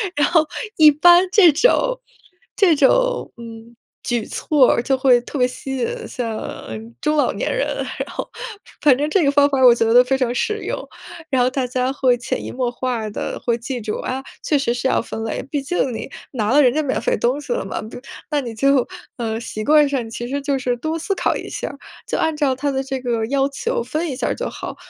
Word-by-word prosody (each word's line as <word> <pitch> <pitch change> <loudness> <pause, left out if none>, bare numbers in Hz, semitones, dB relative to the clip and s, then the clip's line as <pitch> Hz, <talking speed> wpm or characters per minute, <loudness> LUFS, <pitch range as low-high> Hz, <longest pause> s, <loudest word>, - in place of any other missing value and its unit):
然 290 0 +3
后 325 -3 +3 0.3
一 310 -1 +8
般 345 +5 +6
这 365 -4 +7
种 - - +2 0.6
这 365 -6 +5
种， - - +2
嗯， 230 0 -11 0.3
举 240 -3 -1
措 285 -5 +2
儿， - - 0
就 270 0 +1
会 255 -2 +5
特 280 - -7
别 250 - +4
吸 265 +1 -6
引 240 - 0 0.2
像 230 -3 -5 0.4
中 305 - +1
老 290 - +2
年 - - -2
人， - - 0 0.4
然 - - -11
后 - - -5 0.5
反 275 -4 +5
正 295 +2 -1
这 365 0 +2
个 280 - +3
方 285 0 +4
法 275 - 0
儿 260 - +5
我 245 - +9
觉 230 -1 +1
得 245 +1 +8
非 265 +2 0
常 250 -2 0
实 425 - 0
用。 - - -4 0.4
然 260 -3 +2
后 250 - +3
大 260 -1 -2
家 255 +1 -1
会 255 -3 +2
潜 240 - -4
移 - - -6
默 250 -1 -1
化 240 -3 -3
地 - - -5
会 235 -1 +1
记 245 +2 -5
住， 210 0 -3
啊， 260 +1 -3 0.2
确 295 -3 +1
实 240 -3 0
是 245 +2 -1
要 - - +2
分 225 -1 -6
类， - - -3
毕 290 -2 -1
竟 275 -3 -1
你 255 - -7 0.2
拿 220 -4 -1
了 290 +3 +6
人 250 -2 +4
家 310 0 0
免 265 - -1
费 - - +1
东 250 +4 0
西 480 - -3
了 - - -2
嘛， - - -4
不， 220 - -9 0.3
那 295 -2 0
你 235 -3 -6
就， 275 +2 +2 0.3
呃， 225 -2 -2
习 215 -2 -6
惯 300 +2 +5
上 255 -5 -2
其 240 +1 -6
实 280 +3 -3
就 280 -1 -1
是 250 -1 -1
多 315 +6 -3
思 395 +5 -2
考 - - 0
一 - - -8
下 - - -4
儿， 280 - -11 0.3
就 - - -2
按 320 -1 0
照 290 -3 +1
它 285 +2 -2
的 265 0 -1
这 265 -1 -4
个 235 -3 -1
要 275 +2 +1
求， 475 - -2
分 320 +1 -3
一 - - -4
下 - - -1
儿 - - -1
就 - - -4
好。 - - -7
270 Hz, 255 characters per minute, -20 LUFS, 245-300 Hz, 0.6 s, 我